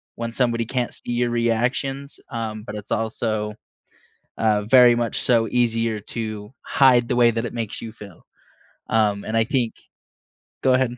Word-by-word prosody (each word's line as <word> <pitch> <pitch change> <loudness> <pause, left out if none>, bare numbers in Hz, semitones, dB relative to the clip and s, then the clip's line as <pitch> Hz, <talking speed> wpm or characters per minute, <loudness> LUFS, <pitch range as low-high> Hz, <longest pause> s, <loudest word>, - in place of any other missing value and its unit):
when 115 0 -4
somebody 115 -2 +1
can't 125 +1 -2
see - - -5
your 120 0 +1
reactions, 125 +4 -1
um, 110 -2 -4
but 105 - -7
it's 105 -1 -8
also, 110 -1 -1 0.8
uh, 105 -2 +2
very 120 +2 +6
much 120 -1 -1
so 115 -2 +3
easier 115 -2 +1
to 110 0 -6
hide 125 -3 +4
the 125 - +1
way 120 -1 +6
that 115 +1 -2
it - - -5
makes 115 -3 -4
you 115 - -7
feel. 100 -6 -13 0.6
Um, 105 -2 +2
and 110 - -3
I 115 - +4
think 120 -3 0 0.9
go 130 - +4
ahead. 125 -1 +1
115 Hz, 165 wpm, -22 LUFS, 110-120 Hz, 0.9 s, very